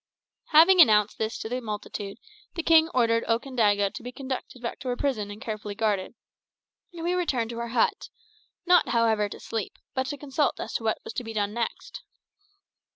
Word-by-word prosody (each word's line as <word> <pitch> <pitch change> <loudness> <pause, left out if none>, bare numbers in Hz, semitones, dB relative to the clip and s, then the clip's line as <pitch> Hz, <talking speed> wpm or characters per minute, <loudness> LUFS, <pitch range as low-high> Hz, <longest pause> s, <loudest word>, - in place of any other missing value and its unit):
Having 340 +4 +7
announced 210 -7 +4
this 220 +1 -2
to - - -5
the 250 +3 -3
multitude, 210 -2 -6 0.4
the 335 - -2
king 325 0 +5
ordered 230 -5 +2
Okandaga 225 -5 +1
to - - -7
be 245 +1 -7
conducted 260 -1 -6
back 240 -1 -5
to 260 - -8
her 245 - 0
prison 245 -7 -1
and 205 +1 -8
carefully 215 -2 -5
guarded; 210 -3 -1 0.8
and 335 -2 -8
we 350 +1 0
returned 265 -11 0
to 235 - -6
our 235 - -3
hut 230 0 0 0.6
not, 355 0 +5
however, 225 -3 +2
to - - -9
sleep, 225 -4 -5 0.2
but 260 0 -1
to 290 - -4
consult 285 +1 -1
as - - -5
to - - -2
what 220 -1 +1
was - - -7
to 250 - -3
be 225 -1 -7
done 205 -1 -1
next. 235 0 -4
235 Hz, 190 wpm, -26 LUFS, 215-270 Hz, 0.8 s, Having